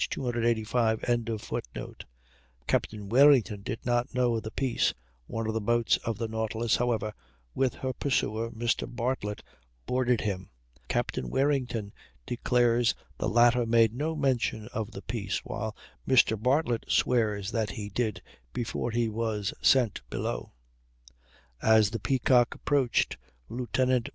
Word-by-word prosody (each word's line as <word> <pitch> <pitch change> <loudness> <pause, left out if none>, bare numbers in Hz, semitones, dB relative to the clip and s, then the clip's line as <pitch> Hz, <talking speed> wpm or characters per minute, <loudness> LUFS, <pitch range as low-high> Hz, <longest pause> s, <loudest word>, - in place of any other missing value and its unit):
285.] 115 -2 0 1.6
Captain 105 - -1
Warrington 120 -4 +5
did 110 - -5
not 120 0 0
know 125 -2 +2
of - - -3
the 110 - -6
peace; 130 +2 0 0.3
one 115 0 -3
of 110 - -1
the 110 - -1
boats 120 +2 +2
of 115 -3 -4
the 115 - -2
Nautilus, 110 +1 0
however, 115 -3 0 0.4
with 135 -2 +1
her 130 -1 -3
purser, 115 -5 -1
Mr. 120 0 -1
Bartlett, 120 -4 -3 0.4
boarded 125 -2 +1
him. 95 -3 -3 0.4
Captain 60 - -1
Warrington 125 - 0 0.3
declares 120 -1 +2 0.2
the - - 0
latter 120 +1 +4
made 115 -1 +4
no 155 +6 -2
mention 130 -6 0
of 110 -3 -4
the 100 -3 -9
peace, 105 -4 -3
while 110 0 -4 0.3
Mr. 125 -4 +5
Bartlett 125 -1 +1
swears 105 -5 +1
that 110 -3 0
he 100 +1 -5
did 110 -2 -2 0.3
before 120 0 -2
he 115 0 +1
was 110 -2 -2
sent 125 -6 +3
below. - - -3 1.1
As 110 -2 +5
the 115 - -3
Peacock 125 0 +3
approached, 140 -4 +1 0.3
Lieut. 120 +1 -4
115 Hz, 130 wpm, -28 LUFS, 110-125 Hz, 1.6 s, Warrington